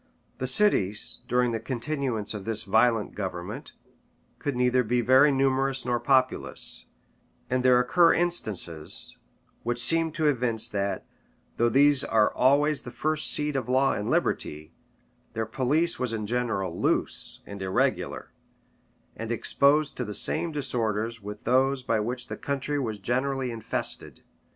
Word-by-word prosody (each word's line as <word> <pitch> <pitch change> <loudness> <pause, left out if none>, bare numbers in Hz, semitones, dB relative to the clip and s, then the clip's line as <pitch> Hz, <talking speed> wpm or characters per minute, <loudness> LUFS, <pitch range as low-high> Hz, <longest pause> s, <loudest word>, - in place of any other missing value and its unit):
The 130 - -1
cities, 120 - +3
during 125 0 +2
the 115 - -2
continuance 125 -2 -3
of 105 -2 -6
this 110 +1 -2
violent 115 -2 +2
government, 100 - -6 0.7
could 145 -3 -3
neither 125 +1 +2
be 120 +2 0
very 130 +5 +5
numerous 135 -1 +1
nor 120 -1 0
populous; 130 +1 0 0.6
and 130 0 +1
there 125 -1 +5
occur 165 +7 +4
instances 105 - -2 0.5
which 120 +1 -2
seem 165 +6 +2
to 155 0 -1
evince 120 -5 +1
that, 100 -1 -2 0.5
though 120 0 +3
these 140 +2 +4
are 110 -2 +2
always 145 +3 +3
the 120 - -9
first 155 +4 +1
seat 150 -1 0
of 130 -2 -2
law 130 +2 +3
and 105 - -3
liberty, 75 +2 -2 0.6
their 110 0 -2
police 140 +9 0
was 125 -2 -2
in 110 -2 -3
general 115 -4 -2
loose - - 0
and 100 -1 -9
irregular, 95 0 -1 0.8
and 115 +1 -5
exposed 140 +5 +2
to 125 - -2
the 105 -3 -5
same 170 - 0
disorders 115 -5 -1
with 105 +1 -8
those 130 +2 +2
by 115 -3 0
which 120 +4 -3
the - - -6
country 140 +1 -2
was 110 -6 -3
generally 130 +5 -1
infested. 115 -1 -4
125 Hz, 145 wpm, -26 LUFS, 110-135 Hz, 0.8 s, very